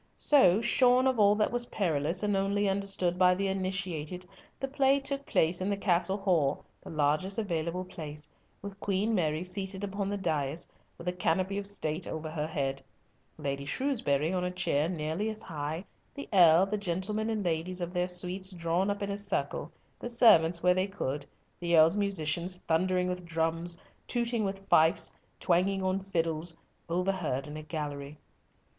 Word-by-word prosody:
So, 220 -9 +5
shorn 250 +1 +4
of 260 -3 +2
all 205 0 +6
that 215 0 +1
was 240 0 -2
perilous, 165 -1 0
and 205 -1 +1
only 200 +1 +1
understood 195 -2 0
by 180 0 +5
the 195 +1 -1
initiated, 185 -3 -2 0.3
the 270 - -2
play 275 0 +3
took 275 0 -4
place 170 +3 +1
in 190 - -1
the 200 - 0
Castle 190 0 +1
Hall, 175 -8 +1 0.2
the - - -9
largest 155 +5 0
available 180 -3 -2
place, 150 -4 -8 0.4
with 200 -1 -8
Queen 200 +3 0
Mary 160 -4 0
seated 190 +1 -3
upon 200 0 -2
the 205 - -2
dais, 155 -4 -2 0.3
with 170 - -10
a - - +2
canopy 185 +2 0
of 200 - -5
State 170 -4 -2
over 160 0 -5
her 155 -1 -2
head, 135 -3 -2 0.6
Lady 140 -2 -3
Shrewsbury 160 - 0
on 180 -1 0
a 180 - 0
chair 160 -4 0
nearly 165 +5 -2
as 215 0 -5
high, 155 +3 -4 0.3
the 280 - -7
Earl, 175 -1 +7
the 210 +1 -2
gentlemen 205 +4 -2
and 215 -3 -2
ladies 175 +2 -1
of 175 0 -4
their 180 0 0
suites 180 +1 -1
drawn 175 +1 -1
up 200 0 -2
in 200 - -2
a 200 - -3
circle, 205 - -2 0.3
the 240 - -5
servants 175 -9 +5
where 180 0 +5
they 185 +2 0
could, 150 -8 -4 0.3
the 170 -1 +2
Earl's 160 +3 +6
musicians 180 -3 0
thundering 180 +2 +2
with 180 0 -3
drums, 165 +1 0 0.3
tooting 235 -2 0
with 195 0 -5
fifes, 160 +1 +3 0.2
twanging 190 +2 +1
on 190 +1 +1
fiddles, 165 -3 -2 0.3
overhead 175 -6 -1
in 150 - -8
a 155 - -6
gallery. 150 -2 -5
180 Hz, 175 wpm, -30 LUFS, 160-200 Hz, 0.6 s, Earl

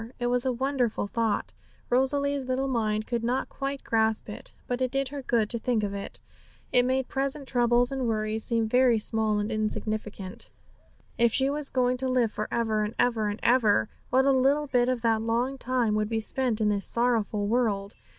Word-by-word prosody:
It 240 - -3
was 250 +1 +1
a - - +2
wonderful 255 -3 -1
thought; 225 +1 -1 0.4
Rosalie's 280 +2 +1
little 260 +1 -1
mind 215 -4 -1
could 235 -2 -2
not 250 +3 -1
quite 275 0 -4
grasp 220 -1 +1
it, 210 - -5
but 245 +1 -3
it 255 - +1
did 275 +1 -1
her 285 0 -6
good 235 -4 +1
to 235 - -1
think 225 -2 0
of 200 -1 -2
it. 200 0 -6 0.5
It 245 0 +4
made 260 0 0
present 275 +1 -2
troubles 245 0 +2
and 265 -2 -2
worries 215 0 -1
seem 230 -2 +1
very 245 0 +4
small 220 0 +1
and 210 +2 -2
insignificant. 215 -2 -3 0.7
If 235 0 +4
she 270 0 +2
was 290 -1 -4
going 250 -1 +1
to 260 +1 0
live 245 -4 +2
for 215 - -4
ever, 220 -2 0
and 210 +2 -4
ever, 230 -3 +1
and 205 +1 -3
ever, 220 - +3 0.2
what 260 +2 +3
a 275 - +5
little 275 +3 +3
bit 250 -3 +1
of 250 -2 -1
that 225 -1 +2
long 240 +4 -1
time 245 -4 0
would 210 0 0
be 225 -1 0
spent 235 0 -1
in 215 -1 +2
this 200 -1 +4
sorrowful 225 -4 +1
world! 205 -3 0
240 Hz, 200 wpm, -27 LUFS, 215-260 Hz, 0.7 s, a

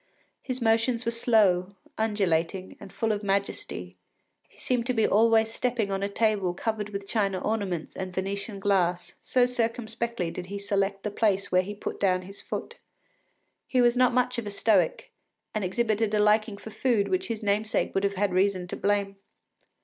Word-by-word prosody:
His 255 -2 -4
motions 230 +2 +2
were 230 - +1
slow, 200 -5 +2 0.2
undulating, 190 -4 0
and 195 - -11
full 225 -1 -1
of 205 -1 -1
majesty; 200 - -3 0.5
he - - -25
seemed 245 -2 -1
to 255 - 0
be 220 - +3
always 225 +1 +4
stepping 235 -5 -1
on 195 0 -1
a 200 - -1
table 200 -4 +1
covered 215 +1 -2
with 200 -1 -6
china 195 -4 0
ornaments 195 -7 -2
and 185 -1 -4
Venetian 195 +2 -3
glass, 180 -3 +1
so 250 -1 +3
circumspectly 230 -5 -2
did 180 +1 -6
he 200 +1 -5
select 200 -1 -1
the 210 - -2
place 200 -2 +1
where 185 0 +5
he 205 +3 -6
put - - -5
down 185 -2 +2
his 195 +2 -11
foot. - - -6 0.9
He 255 - +1
was 240 0 +4
not 250 0 +4
much 250 0 +1
of 220 - -6
a - - -2
Stoic, 200 -4 +1 0.4
and 215 - -1
exhibited 215 +2 0
a - - +2
liking 210 0 +3
for 220 - -10
food 230 -4 +1
which 370 0 -1
his 225 -1 -4
namesake 210 +1 0
would 195 - 0
have 200 0 0
had 195 -1 0
reason 185 -1 +2
to - - -4
blame. 200 -1 0
205 Hz, 180 wpm, -27 LUFS, 195-225 Hz, 0.9 s, where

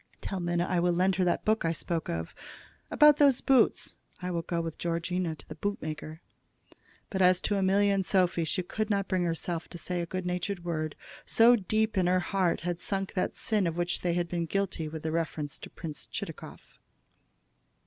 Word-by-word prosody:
Tell 195 - -4
Minna 175 0 0
I 180 - +1
will 175 0 +2
lend 185 +1 +2
her 185 - +2
that 175 - 0
book 220 +1 +2
I 165 0 +1
spoke 165 0 -3
of. 80 0 -3 0.6
About 300 -1 +6
those 280 -4 +5
boots 270 -2 +3 0.2
I 180 0 -3
will 170 -1 -1
go 170 0 -2
with 165 -1 -4
Georgina 170 0 -1
to 150 - -15
the - - -7
boot 205 0 -3
maker." 155 +1 -6 0.9
But 190 -2 -1
as 180 0 +5
to 205 - 0
Amelia 200 +1 +3
and 195 -1 +1
Sophy 180 -2 +2
she 185 +3 -1
could 215 +4 -3
not 200 -2 +1
bring 185 -2 +1
herself 165 0 -2
to 175 - -9
say 175 +1 -3
a 170 - -4
good 185 +1 -4
natured 180 0 -3
word, 155 -3 -2 0.3
so 235 +2 +6
deep 215 0 0
in 180 - +2
her 185 +1 +3
heart 185 -1 0
had 175 0 -2
sunk 195 -1 -2
that 185 - -1
sin 210 -5 0
of 165 0 -3
which 175 0 -1
they 175 -1 0
had 175 -1 0
been 170 -1 -2
guilty 190 -3 -1
with 155 0 -7
reference 160 -3 -2
to - - -9
Prince 155 -4 -8
Chitakov. - - -8
180 Hz, 200 wpm, -29 LUFS, 170-195 Hz, 0.9 s, About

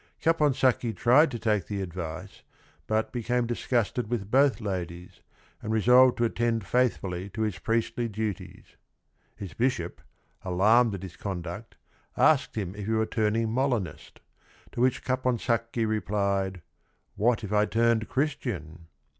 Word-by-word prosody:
Capon 150 -4 +2
sacchi 125 -3 +1
tried 130 +9 +4
to 120 - -5
take 105 -4 0
the 100 -2 -3
advice 90 0 -6 0.5
but 110 0 0
became 120 0 -1
dis 120 0 -5
gusted 120 -1 0
with 110 -4 -3
both 135 -4 +4
ladies, 90 -4 -5 0.4
and 110 - -4
resolved 125 +3 +5
to 120 - +2
attend 115 -2 -1
faithfully 100 -7 0
to 110 +3 -3
his 105 -7 -2
priestly 115 +1 -1
duties. 105 -2 -6 0.6
His 100 -5 -8
bishop, 90 - -1 0.4
alarmed 105 +5 +3
at 95 - -8
his 90 -2 -9
conduct, 95 +3 -6 0.4
asked - - +3
him 95 -4 -3
if 105 0 -7
he 110 - 0
were 110 0 +2
turning 110 0 0
Molinist, 115 - -2 0.5
to - - -4
which 130 0 +2
Caponsacchi 120 -2 0
replied, 100 -4 -1 0.5
"what 120 +2 +1
if 105 0 -4
I 105 0 +3
turned 115 -1 +1
Christian?" 95 - -3
110 Hz, 140 wpm, -27 LUFS, 95-120 Hz, 0.6 s, resolved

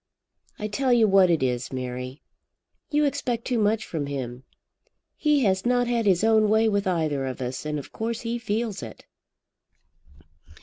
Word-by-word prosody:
"I 210 - -3
tell 255 +5 0
you 235 -3 +5
what 195 -2 +5
it 165 -5 +2
is, 125 -1 -1
Mary. 125 +1 -5 0.7
You 300 0 +2
expect 255 -5 -2
too 245 -3 0
much 215 0 +1
from 150 -4 -4
him. 130 -3 -5 0.7
He 300 -3 +2
has 190 -3 +2
not 245 0 +2
had 235 -2 0
his 185 0 +3
own 220 -1 +4
way 220 +1 +4
with 200 -2 0
either 155 -6 0
of 130 - -5
us, 130 +3 -4
and 150 0 -2
of 140 - -8
course 225 +1 -3
he 235 0 -3
feels 220 -2 -2
it." 110 -2 -10
205 Hz, 170 wpm, -25 LUFS, 140-230 Hz, 0.7 s, you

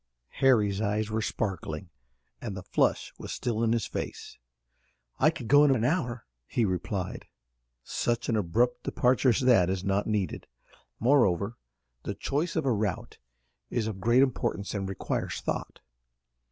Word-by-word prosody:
Harry's 105 -7 +4
eyes 105 0 0
were 110 +1 0
sparkling, 95 -6 -3 0.5
and 105 -5 -5
the 95 - -7
flush - - +1
was - - -6
still 115 -2 -2
in 115 -1 +2
his 115 -2 +1
face. - - -6 0.8
"I 155 - +6
could 155 -8 -6
go 145 +4 +7
in 140 -2 +5
an 115 - -1
hour," 125 -4 0 0.2
he 120 - +1
replied. 90 0 -3 0.6
"Such 120 - -1
an 115 - +1
abrupt 120 +6 +1
departure 130 +1 +2
as 120 - +2
that 115 -9 +5
is 95 0 -2
not 100 +1 0
needed. 105 -5 -2 0.5
Moreover 115 -5 +3 0.5
the - - -4
choice 155 +5 -2
of 160 - 0
a 130 - +3
route 105 -3 -3 0.5
is 115 - -1
of 105 -4 -4
great 120 +6 +5
importance 110 -6 -1
and 95 -2 -3
requires 95 - -3
thought. - - -4
110 Hz, 155 wpm, -28 LUFS, 100-125 Hz, 0.8 s, go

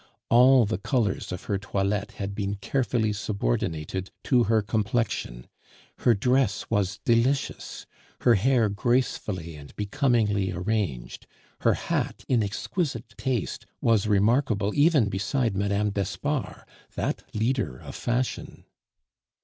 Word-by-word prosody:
All 125 +1 +6
the 100 -2 -2
colors 110 -6 -1
of 90 - -5
her 100 -2 -1
toilette 100 +2 -1
had 100 -1 -4
been 100 0 -2
carefully 110 +1 0
subordinated 95 - -2
to 125 -3 +3
her 110 0 +2
complexion; 105 - -1 0.5
her 120 - +4
dress 125 0 +1
was 100 -4 0
delicious, 120 +4 0 0.4
her 120 - +5
hair 115 +2 +3
gracefully 100 -6 -1
and 70 -1 -12
becomingly 105 -4 +1
arranged, 90 - -3 0.3
her - - +3
hat, - - -2
in 125 -3 +3
exquisite 115 - -3
taste, 125 -7 -2
was 110 -3 +2
remarkable 105 0 +2
even 145 -6 +4
beside 100 +4 -1
Mme. 100 +1 +1
d'Espard, 120 - -3 0.3
that - - -2
leader 110 - 0
of - - -10
fashion. 120 +1 -3
105 Hz, 115 wpm, -26 LUFS, 100-120 Hz, 0.5 s, All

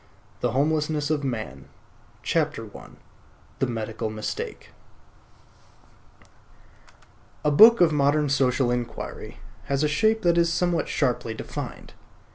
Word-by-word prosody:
THE 120 -1 -1
HOMELESSNESS 150 +1 0
OF 150 -2 0
MAN 110 - -4 0.6
I. - - -2 0.7
THE 135 - +1
MEDICAL 110 -2 -4
MISTAKE 110 0 -6 2.7
A 150 - +3
book 225 +10 +8
of 170 -2 +5
modern 150 0 +2
social 130 -2 +1
inquiry 120 -2 -5 0.3
has 140 +1 0
a - - +3
shape 220 +9 +1
that 170 0 +3
is 170 -1 +2
somewhat 175 0 0
sharply 120 -4 -1
defined. - - -7
145 Hz, 105 wpm, -25 LUFS, 120-155 Hz, 2.7 s, book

